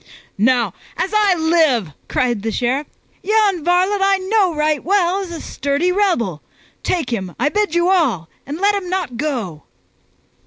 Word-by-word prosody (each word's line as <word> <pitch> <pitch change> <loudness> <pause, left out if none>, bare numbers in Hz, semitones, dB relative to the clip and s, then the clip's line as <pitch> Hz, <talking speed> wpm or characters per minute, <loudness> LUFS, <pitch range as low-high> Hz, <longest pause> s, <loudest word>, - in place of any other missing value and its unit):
"Now 240 +2 +2 0.2
as 380 - -1
I 415 -3 +4
live," 320 - +2 0.2
cried 240 -4 0
the 225 +2 -2
Sheriff, 260 +5 -1 0.3
"yon 410 -5 +2
varlet 370 +4 +2
I 390 0 +4
know 380 -2 +1
right 300 0 0
well 375 0 +2
is 370 -3 -6
a 335 - -6
sturdy 285 +5 -1
rebel! 345 - 0 0.4
Take 325 -9 -1
him, 190 -5 -4
I 290 - +2
bid 415 -1 0
you 345 +1 +3
all, 255 - +1 0.2
and 290 +2 -4
let 400 +3 +2
him 390 -3 -3
not 365 -10 -2
go!" 230 - -3
335 Hz, 160 wpm, -19 LUFS, 250-380 Hz, 0.4 s, I